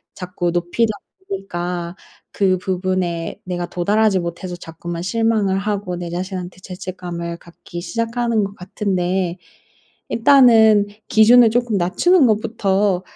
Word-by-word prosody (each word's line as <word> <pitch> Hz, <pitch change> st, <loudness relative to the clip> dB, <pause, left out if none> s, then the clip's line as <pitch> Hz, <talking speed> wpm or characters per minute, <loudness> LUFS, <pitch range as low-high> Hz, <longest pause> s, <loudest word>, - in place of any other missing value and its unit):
자꾸 180 Hz, -1 st, -3 dB
높이다 175 Hz, +6 st, 0 dB, 0.4 s
보니까 175 Hz, -2 st, -4 dB, 0.4 s
그 190 Hz, -2 st, +2 dB
부분에 180 Hz, -2 st, -2 dB
내가 175 Hz, -1 st, -3 dB
도달하지 200 Hz, +3 st, +1 dB
못해서 175 Hz, +1 st, -5 dB
자꾸만 170 Hz, +1 st, -7 dB
실망을 220 Hz, -1 st, +1 dB
하고 200 Hz, -2 st, -2 dB
내 175 Hz, -1 st, -5 dB
자신한테 180 Hz, 0 st, -5 dB
죄책감을 180 Hz, -2 st, -6 dB
갖기 170 Hz, 0 st, -11 dB
시작하는 230 Hz, +1 st, -1 dB
것 200 Hz, +1 st, -5 dB
같은데 185 Hz, -1 st, -2 dB, 0.7 s
일단은 225 Hz, -5 st, +5 dB, 0.2 s
'기준을 230 Hz, +2 st, +6 dB
쪼끔 240 Hz, -1 st, 0 dB
낮추는 260 Hz, -, +3 dB
것부터 205 Hz, -3 st, +1 dB
185 Hz, 285 characters per minute, -19 LUFS, 175-215 Hz, 0.7 s, 기준을